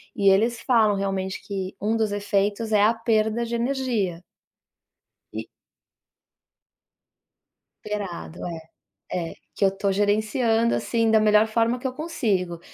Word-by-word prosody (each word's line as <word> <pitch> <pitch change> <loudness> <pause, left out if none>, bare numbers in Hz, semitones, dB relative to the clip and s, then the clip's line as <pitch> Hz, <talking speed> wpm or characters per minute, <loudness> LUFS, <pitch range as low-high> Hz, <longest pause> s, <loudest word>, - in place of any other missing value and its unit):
e 200 -2 +4
eles 225 +4 +3
falam 220 -5 +3
realmente 195 -1 -2
que 190 -2 -5
um 215 +3 +1
dos 220 -2 0
efeitos 205 +2 -1
é 210 -1 +4
a 220 +2 +5
perda 225 0 0
de 235 0 -3
energia. 235 -8 -1 1.1
E - - -6 2.4
Esperado, 200 -5 -5 0.7
é, 170 -2 -2
é, - - -10 0.2
que - - -1
eu 195 - +4
tô 200 0 0
gerenciando, 220 +3 +2
assim, 230 -1 +1
da 220 - +5
melhor 215 0 +4
forma 230 +2 +1
que 260 - -2
eu 255 - -4
consigo. 210 - -2
215 Hz, 130 wpm, -24 LUFS, 195-230 Hz, 2.4 s, a